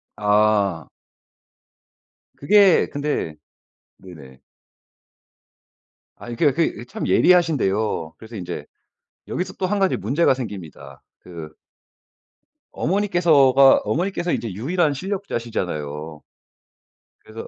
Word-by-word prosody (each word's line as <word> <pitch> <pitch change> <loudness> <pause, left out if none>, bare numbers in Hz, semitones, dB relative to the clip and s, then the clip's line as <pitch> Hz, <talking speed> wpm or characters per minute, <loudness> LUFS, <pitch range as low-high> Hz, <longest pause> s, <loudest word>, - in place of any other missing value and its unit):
아. 105 -5 +1 1.5
그게 195 +5 +4
근데 145 - -3 0.6
네네. 70 -8 -14 1.7
아니 120 -1 -8
그게 145 +2 +3
그 165 -6 -1
이 - - -9
참 220 - -5
예리하신데요. 110 - +2
그래서 110 +1 -12
인제 90 -3 -6 0.6
여기서 180 - -4
또 185 - 0
1 205 +1 -1
가지 190 -1 +1
문제가 135 - +1
생깁니다. 100 - -9 0.2
그 85 -4 -10 1.2
어머니께서가 160 -8 +4
어머니께서 175 +1 -2
이제 110 -5 -3
유일한 150 - 0
실력자시잖아요. 90 - -5 1.0
그래서 110 +1 -9
120 Hz, 225 characters per minute, -21 LUFS, -, 1.7 s, 그게